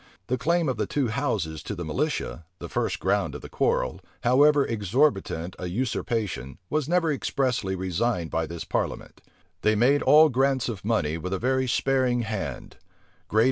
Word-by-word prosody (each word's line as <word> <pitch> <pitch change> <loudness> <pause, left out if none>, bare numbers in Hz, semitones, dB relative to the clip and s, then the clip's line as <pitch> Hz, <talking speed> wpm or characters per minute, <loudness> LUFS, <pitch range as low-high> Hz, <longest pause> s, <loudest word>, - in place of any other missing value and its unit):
[*] 90 - -45
The 125 - +1
claim 170 +2 +1
of 130 -3 -1
the 105 - -1
two 135 -5 0
houses 80 - -2
to 105 - -5
the 85 -2 -5
militia, 85 - -2
the - - -7
first - - -1
ground - - 0
of - - -7
the - - -9
quarrel, - - 0 0.2
however 140 +4 +5
exorbitant 105 - 0
a 90 - -4
usurpation, 105 - -2
was 155 -1 0
never 170 -3 +2
expressly 125 -8 -1
resigned 95 0 -1
by 80 0 -1
this 85 0 -6
parliament. - - -3 0.4
They 110 0 +3
made 130 +7 +4
all 155 +1 +7
grants 135 0 +1
of 105 -6 -6
money 85 -8 0
with 90 +4 -4
a - - 0
very 130 +4 +1
sparing 125 -1 +1
hand. 100 - -5
115 Hz, 170 wpm, -26 LUFS, 90-135 Hz, 0.4 s, all